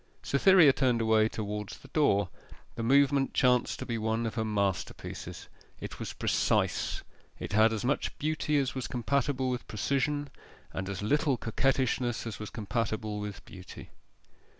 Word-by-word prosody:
Cytherea 160 Hz, 0 st, +6 dB
turned 125 Hz, -4 st, +2 dB
away 110 Hz, -1 st, +3 dB
towards 105 Hz, -2 st, -5 dB
the -, -, -15 dB
door. 100 Hz, -, +2 dB, 0.4 s
The -, -, -5 dB
movement 140 Hz, +3 st, +3 dB
chanced 125 Hz, -1 st, +3 dB
to -, -, -6 dB
be 115 Hz, -1 st, -3 dB
one 110 Hz, +1 st, -1 dB
of 115 Hz, -, -2 dB
her 110 Hz, -, -1 dB
masterpieces. 100 Hz, -4 st, -3 dB, 0.3 s
It -, -, -7 dB
was -, -, -4 dB
precise: -, -, 0 dB, 0.3 s
it -, -, -6 dB
had 110 Hz, +1 st, +5 dB
as 110 Hz, +1 st, -3 dB
much 140 Hz, -, -1 dB
beauty 150 Hz, 0 st, 0 dB
as 135 Hz, -2 st, 0 dB
was 130 Hz, -2 st, -4 dB
compatible 130 Hz, +1 st, 0 dB
with 125 Hz, -, -4 dB
precision, 140 Hz, +5 st, -1 dB, 0.4 s
and 95 Hz, 0 st, -4 dB
as 100 Hz, 0 st, -4 dB
little 140 Hz, +3 st, +2 dB
coquettishness 125 Hz, 0 st, 0 dB
as 115 Hz, -, -6 dB
was 105 Hz, -, -6 dB
compatible 110 Hz, -1 st, -3 dB
with 105 Hz, -1 st, -6 dB
beauty. 95 Hz, -1 st, -11 dB
115 Hz, 150 wpm, -29 LUFS, 110-135 Hz, 0.4 s, Cytherea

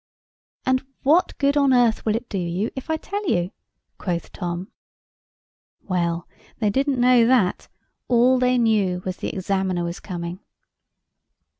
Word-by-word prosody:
"And 260 Hz, 0 st, +2 dB, 0.2 s
what 320 Hz, +7 st, +3 dB
good 280 Hz, 0 st, +2 dB
on 280 Hz, -2 st, +4 dB
earth 240 Hz, -3 st, +3 dB
will 215 Hz, -, +2 dB
it 235 Hz, +1 st, -4 dB
do 200 Hz, -, -3 dB
you 180 Hz, +5 st, -2 dB
if 265 Hz, +3 st, -7 dB
I 320 Hz, -, +2 dB
did 315 Hz, -, -9 dB
tell 405 Hz, -2 st, -3 dB
you?" 175 Hz, +1 st, +1 dB, 0.5 s
quoth 175 Hz, -3 st, -3 dB
Tom. 175 Hz, +1 st, -5 dB, 1.1 s
Well, 170 Hz, -2 st, -1 dB, 0.3 s
they 210 Hz, -3 st, +1 dB
didn't 270 Hz, +2 st, +1 dB
know 245 Hz, -1 st, +5 dB
that: 235 Hz, -7 st, +2 dB, 0.4 s
all 250 Hz, +1 st, +4 dB
they 250 Hz, 0 st, +3 dB
knew 205 Hz, -6 st, +1 dB
was 185 Hz, -1 st, -3 dB
the -, -, -3 dB
examiner 190 Hz, -2 st, -1 dB
was 170 Hz, +1 st, -4 dB
coming. 175 Hz, -1 st, -6 dB
215 Hz, 150 wpm, -23 LUFS, 180-255 Hz, 1.1 s, know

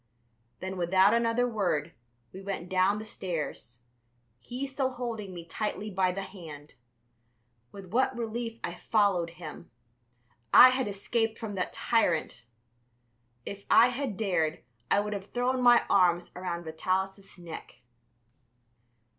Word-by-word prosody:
Then, 190 Hz, 0 st, -4 dB
without 185 Hz, +3 st, +4 dB
another 235 Hz, +1 st, +2 dB
word, 190 Hz, -10 st, -1 dB, 0.4 s
we 190 Hz, -, -8 dB
went 190 Hz, -3 st, -5 dB
down 185 Hz, +2 st, +3 dB
the 215 Hz, -, -6 dB
stairs, 160 Hz, -, -5 dB, 0.6 s
he 250 Hz, -, -5 dB
still 270 Hz, -1 st, -1 dB
holding 230 Hz, -5 st, -5 dB
me 175 Hz, -2 st, -8 dB
tightly 210 Hz, +3 st, -4 dB
by 185 Hz, -1 st, +2 dB
the 195 Hz, +2 st, -4 dB
hand. 155 Hz, -7 st, -11 dB, 1.0 s
With 195 Hz, -3 st, -11 dB
what 260 Hz, +1 st, +2 dB
relief 230 Hz, 0 st, -4 dB
I -, -, -3 dB
followed 200 Hz, -6 st, +1 dB
him! 165 Hz, -4 st, -9 dB, 0.8 s
I 255 Hz, -, +10 dB
had 255 Hz, -1 st, 0 dB
escaped 225 Hz, +3 st, -1 dB
from 220 Hz, -3 st, -5 dB
that 185 Hz, -2 st, -2 dB
tyrant! 170 Hz, -, 0 dB, 1.0 s
If 200 Hz, 0 st, -7 dB
I 235 Hz, +2 st, +7 dB
had 250 Hz, -5 st, -3 dB
dared 170 Hz, -7 st, 0 dB, 0.3 s
I 200 Hz, -, +4 dB
would 210 Hz, 0 st, -3 dB
have 200 Hz, 0 st, -7 dB
thrown 250 Hz, +1 st, +1 dB
my 240 Hz, -1 st, +6 dB
arms 175 Hz, -2 st, +3 dB
around 175 Hz, -1 st, -4 dB
Vitalis' 190 Hz, +5 st, -3 dB
neck. 170 Hz, -6 st, -10 dB
200 Hz, 130 wpm, -29 LUFS, 180-230 Hz, 1.0 s, I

